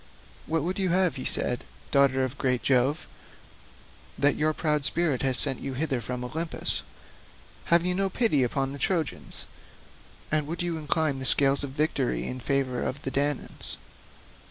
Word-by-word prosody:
"What 160 -2 0
would 185 +4 -3
you 190 -1 +1
have," 180 -6 +1
said 125 - 0
he, - - -17 0.3
"daughter 135 -2 +3
of 130 +2 -4
great 125 -2 +1
Jove, 135 +4 +1 1.1
that 145 0 +4
your 155 +1 +1
proud 150 -2 -1
spirit 155 -3 +1
has 130 -2 +3
sent 135 -3 +1
you 135 -1 -5
hither 135 -3 -1
from 125 +2 -5
Olympus? 160 +6 -2 0.8
Have 170 0 +4
you 180 - +2
no 195 +1 0
pity 205 - +1
upon 135 +2 -1
the 140 - -7
Trojans, 165 +2 -2 0.9
and 150 -1 +1
would 170 +2 -3
you 170 -2 -2
incline 150 -2 0
the 130 - -5
scales 140 +1 +4
of 140 - -4
victory 145 -2 -1
in 130 - -5
favour 130 -1 -1
of 140 +3 -4
the 135 - -3
Danaans? 145 0 +3
145 Hz, 165 wpm, -27 LUFS, 130-160 Hz, 1.1 s, that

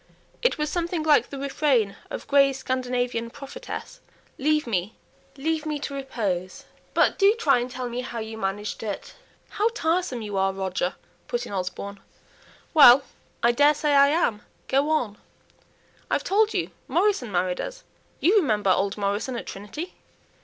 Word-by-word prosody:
It - - +2
was 300 0 -1
something 340 -2 -1
like 305 -2 +4
the 280 - -7
refrain 270 -6 +1
of - - -6
Gray's 275 -1 +4
Scandinavian 250 -2 -2
Prophetess: 275 +3 -8 0.4
"Leave 305 +2 +2
me, 205 -2 -2 0.4
leave 315 +2 -1
me 305 -1 -2
to 285 0 -5
repose." 205 -10 -3 0.3
"But - - +3
do 400 +2 +5
try 280 - +3
and 245 +1 -3
tell 250 0 -4
me 240 +1 -3
how 240 - -6
you 220 0 -5
managed 205 0 -3
it." 210 -3 -5 0.4
"How 425 +2 +1
tiresome 325 - 0
you 205 -2 -4
are, 195 0 +2
Roger!" 190 -1 -2 0.3
put 240 0 -2
in - - -8
Osborne. 195 +2 -4 0.7
"Well, 275 -4 +9 0.4
I 235 - +6
daresay 295 +3 +3
I 280 0 +7
am. 280 -9 +1 0.3
Go 275 +3 +2
on!" 245 -10 0 0.9
"I've - - 0
told 430 +2 +3
you - - -1 0.2
Morrison 335 - +1
married 180 0 0
us. - - -7 0.4
You 380 +7 +4
remember 215 - +2
old 195 +2 +1
Morrison 205 +5 -1
at 235 - -5
Trinity?" 295 - -7
255 Hz, 155 wpm, -25 LUFS, 210-300 Hz, 0.9 s, Well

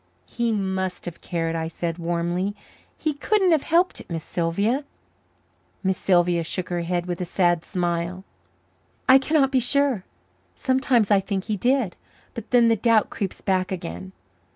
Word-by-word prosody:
"He 235 -1 -1
must 190 -3 -2
have 175 -2 -7
cared," 165 -1 -2
I 160 0 -2
said 165 +1 -4
warmly. 175 +3 -1 0.4
"He 310 -1 -1
couldn't 380 +5 +2
have 315 -3 +4
helped 345 +5 +1
it, - - -16
Miss 165 -2 -4
Sylvia." 200 - 0 1.0
Miss 190 0 +1
Sylvia 175 -2 +3
shook 180 +2 -3
her 175 -1 -1
head 175 0 -1
with 175 0 -4
a - - 0
sad 175 -1 +1
smile. 175 0 -2 0.8
"I 260 +1 +8
cannot 270 -1 +2
be 265 - +3
sure. 255 -4 +2 0.5
Sometimes 255 - +2
I 200 - +6
think 195 -1 -3
he 215 - -2
did. 245 -2 +1 0.4
But 230 -1 -8
then 240 -2 +5
the 230 - +4
doubt 225 0 +2
creeps 195 -3 -4
back 185 -1 0
again. 95 - -6
190 Hz, 160 wpm, -24 LUFS, 175-240 Hz, 1.0 s, I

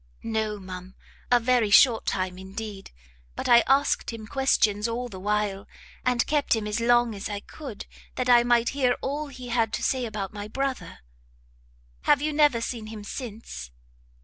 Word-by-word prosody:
"No, 220 -2 -2
ma'am, 185 0 -9 0.3
a 245 - +5
very 240 -2 +2
short 225 +2 +6
time 185 -1 -2
indeed; 195 +1 -7 0.5
but - - -4
I 240 -1 +8
asked 275 -1 +2
him 225 -2 -8
questions 215 -5 +2
all 240 +2 -3
the 190 -4 -9
while, 205 0 -1 0.4
and 250 -1 +2
kept 295 -5 +2
him 220 -1 -3
as 210 +2 -1
long 240 0 +3
as 200 +1 -5
I 205 -1 -3
could, 265 -6 -9 0.3
that 255 - -1
I 240 -1 +7
might 240 0 +3
hear 260 -3 +2
all 295 +2 -3
he 255 -3 -9
had 230 -2 +1
to - - -2
say 255 -2 0
about 210 -3 -5
my 205 0 -6
brother." 270 +3 -4 1.0
"Have 290 - +5
you 300 +1 -1
never 290 -6 +4
seen 230 -2 -4
him 215 -1 -8
since?" 210 - -7
230 Hz, 175 wpm, -26 LUFS, 210-250 Hz, 1.0 s, I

